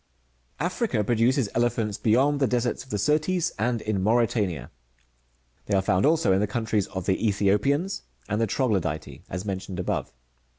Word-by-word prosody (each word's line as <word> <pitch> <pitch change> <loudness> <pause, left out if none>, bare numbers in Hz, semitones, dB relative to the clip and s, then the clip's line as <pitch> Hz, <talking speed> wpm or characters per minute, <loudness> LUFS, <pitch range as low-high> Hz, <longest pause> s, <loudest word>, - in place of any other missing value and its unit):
Africa 175 - 0
produces 120 +3 +2
elephants, 115 -3 0
beyond 135 +6 +3
the 135 - +3
deserts 120 0 -1
of 130 - -20
the 105 - -1
Syrtes, 155 - +1
and 115 +1 0
in 105 -3 -1
Mauritania: 105 - +1 1.0
they 100 - +1
are 95 - +3
found 95 +3 +2
also 155 -10 +3
in 95 - +3
the 105 - +1
countries 110 -2 -1
of 95 -2 -5
the 95 - +2
^Ethiopians 110 - +1 0.3
and 105 +2 -1
t^e 115 - +2
Troglodytce, 95 - -1
as 95 +2 -4
mentioned 95 -1 -4
above. 90 - -2
110 Hz, 160 wpm, -26 LUFS, 100-130 Hz, 1.0 s, beyond